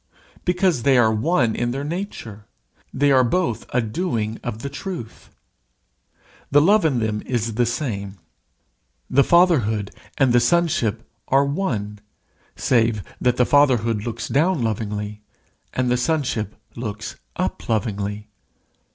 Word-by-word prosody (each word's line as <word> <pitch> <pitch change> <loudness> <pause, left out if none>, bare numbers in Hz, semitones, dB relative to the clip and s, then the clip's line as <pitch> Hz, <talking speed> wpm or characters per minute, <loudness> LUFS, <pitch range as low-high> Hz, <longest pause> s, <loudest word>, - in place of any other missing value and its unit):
Because 180 -5 +2
they 135 +1 +4
are 110 -2 +4
one 120 -1 +1
in 120 - -1
their 135 +3 -3
nature; 145 - -6 0.4
they 145 +1 +2
are 130 -1 +5
both 125 -1 -1
a 125 - +2
doing 110 -4 -2
of 115 -1 -5
the - - -2
truth. 145 - -7 1.2
The 145 - +5
love 195 +5 +4
in 145 -5 +2
them 110 -2 -1
is 115 -3 -1
the 120 +2 +1
same. 105 -7 -3 0.9
The 140 - +5
Fatherhood 125 - +3 0.3
and 130 -3 +3
the 120 - +6
Sonship 120 -6 +1 0.2
are 135 +1 +4
one, 115 - -2 0.6
save 115 -4 +1 0.2
that 125 -1 +2
the 125 - +4
Fatherhood 120 -7 +3
looks 115 -1 -4
down 155 0 +2
lovingly, 105 -1 -3 0.5
and 125 -1 0
the 125 - +3
Sonship 125 - -1 0.2
looks 110 -2 -6 0.2
up - - -3
lovingly. 105 -1 -2
120 Hz, 135 wpm, -22 LUFS, 110-145 Hz, 1.2 s, the